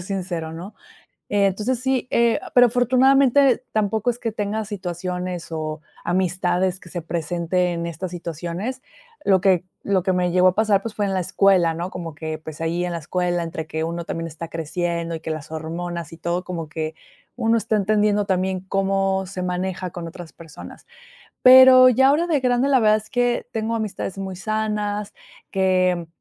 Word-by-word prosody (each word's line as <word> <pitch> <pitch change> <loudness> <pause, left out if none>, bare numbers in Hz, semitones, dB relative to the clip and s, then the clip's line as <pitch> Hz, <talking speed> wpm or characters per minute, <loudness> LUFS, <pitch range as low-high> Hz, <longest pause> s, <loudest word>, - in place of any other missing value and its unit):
ser - - -7
sincero, 180 -4 -4
¿no? 175 +6 -8 0.6
Entonces 205 +5 +1
sí, 260 -1 0
eh, 235 -1 +3 0.2
pero 245 0 +8
afortunadamente 260 +2 +4
tampoco 220 +2 +1
es 240 - -5
que 225 - -2
tenga 215 +1 -3
situaciones 180 -3 -5
o 155 -1 -4 0.2
amistades 180 0 0
que 170 - -15
se 175 - -5
presenten 170 +1 -1
estas 170 +2 -5
situaciones. 175 - -5 0.4
Lo 190 -2 +4
que 185 -3 +3 0.2
lo 195 -2 +1
que 190 - +2
me 180 -1 +1
llegó 180 +1 +5
a 180 - +1
pasar, 215 -2 +3
pues, 225 -2 -6
fue 205 - -1
en 195 - -2
la 185 - +1
escuela, 180 -2 +3
¿no?, 175 +3 -4
como 165 -3 -7
que 155 0 -5
pues 155 0 -10
ahí 170 +2 -1
en 175 - -3
la 170 - -3
escuela, 175 +2 -1
entre 165 -1 -5
que 160 0 -3
uno 170 +1 -4
también 165 0 -4
está 165 +1 -8
creciendo 170 +1 -3
y - - -8
que 160 - -6
las 155 -1 -5
hormonas 165 +1 -5
y 165 - -10
todo, 170 +2 -2
como 165 -4 -5
que 155 0 -4 0.4
uno 230 -1 +2
está 220 - -2
entendiendo 210 0 +2
también 190 -1 0
cómo 195 0 0
se 185 0 -6
maneja 180 0 -3
con 170 -1 -7
otras 170 0 -10
personas. 165 - -12 0.6
Pero 255 0 +9
ya 265 +2 +4
ahora 310 +5 +3
de 310 -5 +1
grande, 250 +2 +2
la 265 -2 +4
verdad 215 -1 +5
es 215 0 -7
que 245 -2 0
tengo 225 +1 -2
amistades 200 -3 -4
muy 190 -1 -5
sanas 210 0 -2 0.4
que 185 -3 +1
185 Hz, 180 wpm, -22 LUFS, 170-215 Hz, 0.6 s, Pero